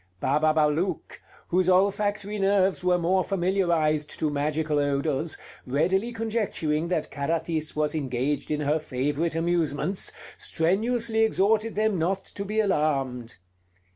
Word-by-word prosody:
Bababalouk, 155 - +1 0.3
whose 185 +1 +2
olfactory 205 +2 +1
nerves 195 -1 +2
were 180 0 +3
more 180 +2 +2
familiarized 170 -6 0
to 155 -2 0
magical 150 +1 0
odors, 145 +2 0 0.3
readily 185 - +1
conjecturing 210 -9 -1
that 170 -3 -2
Carathis 160 +1 -2
was 150 0 0
engaged 140 -1 -2
in 150 0 -1
her 150 +2 +1
favorite 145 +4 -2
amusements, 165 +1 -1 0.3
strenuously 220 +7 +1
exhorted 220 0 +2
them 215 -3 +1
not 190 +4 -1
to 200 - -6
be 210 +2 -2
alarmed. 135 - 0
165 Hz, 115 wpm, -26 LUFS, 150-195 Hz, 0.3 s, were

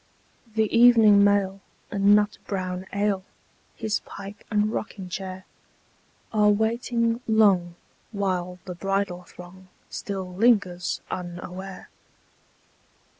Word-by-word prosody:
(The 220 -1 +1
evening 225 -4 +7
mail 200 -1 +2 0.3
and 200 0 +5
nut 210 0 +1
brown 185 -1 -3
ale, 200 -1 0 0.5
His 220 -2 -1
pipe 200 0 -10
and 210 0 +1
rocking 195 -4 -5
chair, 185 +1 -6 0.9
Are 210 -1 +4
waiting 230 +2 +1
long, 195 -6 +3 0.4
while 185 -3 -2
the 180 - -5
bridal 195 0 -2
throng 180 +1 -14 0.2
Still 190 -2 -5
lingers 185 -4 +2
unaware.) 180 +2 -7
200 Hz, 100 wpm, -25 LUFS, 185-210 Hz, 0.9 s, evening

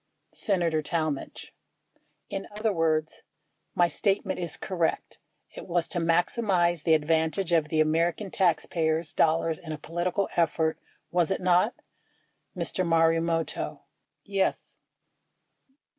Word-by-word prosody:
Senator 170 -6 0
Talmadge. 155 -2 -3 0.7
In 195 0 -5
other 215 0 0
words, 160 -2 0 0.5
my 175 - +4
statement 195 +3 0
is 170 -4 -3
correct. 170 -3 -2 0.4
It - - -9
was 175 -1 0
to 175 - 0
maximize 175 0 +2
the 160 -2 +5
advantage 160 +4 +1
of 160 -3 +2
the 155 0 +2
American 170 +5 0
taxpayers' 165 -3 0
dollars 160 0 +2
in 160 - -8
a 155 - -4
political 175 +5 -2
effort, 160 -1 +1 0.3
was 175 -2 +2
it 190 - 0
not? 180 +5 +3 0.8
Mr. 185 - -1
Marumoto. 165 0 +1 0.4
Yes. 195 -2 -2
170 Hz, 115 wpm, -27 LUFS, 160-180 Hz, 0.8 s, the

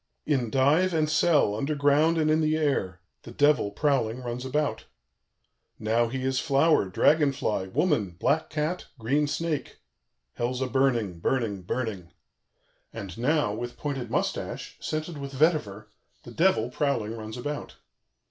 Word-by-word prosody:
"In 130 -6 0
dive 150 +9 +3
and 155 -1 +2
cell, 150 -7 +3
underground 145 +6 +2
and 155 -1 +2
in 155 +1 +3
the 155 0 +2
air, 95 - -1 0.2
the - - -12
Devil, 140 -3 +3
prowling, 125 0 0
runs 120 +1 -4
about. 150 +3 -1 0.9
"Now 115 +2 +1
he 130 +2 -4
is 130 0 0
flower, 140 - +3
dragon 145 - +3
fly, 110 -8 -2
woman, 125 - 0
black 160 +3 +1
cat, 155 +4 -2
green 140 +6 +1
snake; 160 0 -3 0.6
Hell's 125 +1 -2
a 130 - 0
burning, 120 -8 +1
burning, 110 -2 -1
burning. 95 -3 -4 0.8
"And 100 -5 -7
now, 130 -2 +1
with 120 +3 -6
pointed 140 -4 -4
mustache, - - -3
scented 155 0 -4
with 140 0 -6
vetiver, 120 - 0 0.3
the 120 - -11
Devil, 125 -5 +2
prowling, 120 -6 -1
runs 110 +1 -7
about. 145 +4 -5
135 Hz, 140 wpm, -27 LUFS, 115-150 Hz, 0.9 s, dive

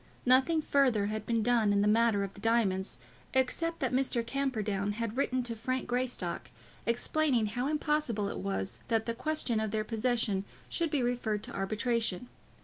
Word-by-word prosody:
Nothing 265 +6 +4
further 255 -9 +3
had 215 0 -4
been 230 -2 +1
done 230 -3 +3
in 200 0 +3
the - - +3
matter 220 -1 +3
of 195 - -5
the - - -13
diamonds, 200 - +1 0.4
except 330 +6 +1
that 260 -2 0
Mr. 250 -3 +1
Camperdown 215 -6 -1
had 230 0 -3
written 255 -1 +1
to 235 -1 -3
Frank 255 +3 -2
Greystock, 240 - -2 0.4
explaining 245 +1 +2
how 245 +5 -2
impossible 300 -8 0
it - - -4
was 95 0 -2
that 225 -1 +1
the 230 - -1
question 260 -3 -1
of 220 0 -1
their 215 +1 -1
possession 225 -3 0 0.3
should 335 -2 -1
be 290 -4 +1
referred 240 -4 -1
to - - -7
arbitration. 220 +2 -1
230 Hz, 170 wpm, -31 LUFS, 210-255 Hz, 0.4 s, Nothing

